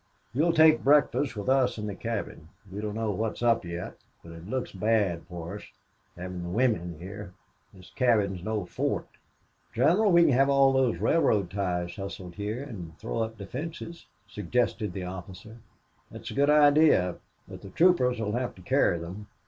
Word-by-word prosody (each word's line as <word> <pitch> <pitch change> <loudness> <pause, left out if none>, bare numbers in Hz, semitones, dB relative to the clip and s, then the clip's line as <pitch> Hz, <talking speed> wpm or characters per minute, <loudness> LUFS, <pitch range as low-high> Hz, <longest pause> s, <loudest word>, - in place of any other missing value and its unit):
"You'll 155 +7 +2
take 160 -1 +5
breakfast 145 -1 +3
with 105 -1 -6
us 130 -2 +2
in 105 - -4
the 105 - -4
cabin. 100 -7 -5 0.2
We 100 +2 -5
don't 105 -1 -4
know 110 -1 -1
what's 110 +4 -3
up 115 -1 +3
yet. 85 0 -6 0.3
But 85 - -11
it 85 +2 -11
looks 130 0 -3
bad 100 -4 0
for 85 +2 -7
us - - -12 0.5
having 90 0 -6
the 85 - -5
women 90 -6 0
here. 95 +3 -9 0.4
This 90 -2 -16
cabin 110 -7 +2
is 90 - -9
no 105 -2 -2
fort." - - -2 0.7
"General, 175 - +3
we 170 -1 +6
can 165 - +4
have 135 +2 +3
all 135 -1 +4
those 130 -3 +2
railroad 105 - +2
ties 90 -2 -2
hustled 95 -2 -7
here 105 +7 -4
and 90 - -9
throw - - -4
up 110 0 -3
defenses," 160 - -7 0.2
suggested 105 -1 -1
the 95 - -5
officer. 95 +4 -9 0.5
"That's - - -9
a - - -6
good 140 +1 +2
idea. 145 - +5 0.3
But - - -10
the 100 - -10
troopers 125 - +3
will 105 -2 -2
have 120 +2 -3
to 90 - -15
carry 85 - +2
them. 90 +5 -8
105 Hz, 180 wpm, -27 LUFS, 90-130 Hz, 0.7 s, we